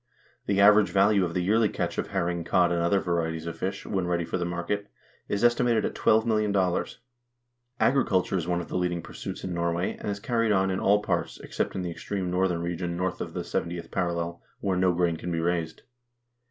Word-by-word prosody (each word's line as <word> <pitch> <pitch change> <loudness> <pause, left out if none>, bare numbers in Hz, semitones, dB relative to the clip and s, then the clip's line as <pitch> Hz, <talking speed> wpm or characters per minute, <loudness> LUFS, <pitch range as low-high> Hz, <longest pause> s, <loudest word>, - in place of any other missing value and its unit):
The 100 -1 +1
average 105 +1 +6
value 100 0 +4
of 85 - -5
the 90 - +1
yearly 110 +3 +3
catch - - -3
of - - -2
herring, 85 0 -1
cod, 85 +1 +3
and 85 -1 +1
other 85 +4 +3
varieties 80 -3 -2
of 85 - -4
fish, 95 +2 -4
when 95 -3 -1
ready 85 -1 0
for 95 - -3
the 85 - -1
market, 85 +4 -3 0.4
is 100 +2 -1
estimated 120 -1 +3
at - - -2
$12,000,000. 105 -5 +1 0.8
Agriculture 100 -9 +2
is 90 -3 -1
one 90 0 0
of 85 - -8
the - - -3
leading 90 -1 -1
pur - - -11
suits - - -6
in 95 - -3
Norway, 85 +1 -1
and - - -4
is 100 0 -3
carried 115 0 0
on 95 -1 +2
in 95 - -1
all 105 +1 +3
parts, - - -2
except - - -3
in 95 - -2
the 90 - -3
extreme 90 +2 -4
northern 90 -2 +1
region 85 0 -3
north 90 0 -2
of - - -6
the - - -1
70th 85 -1 -4
parallel, 85 -1 -2 0.2
where 95 -2 0
no 90 0 +3
grain 85 -1 +1
can 90 - -5
be 85 - -1
raised. 85 -1 -2
90 Hz, 210 wpm, -27 LUFS, 85-100 Hz, 0.8 s, average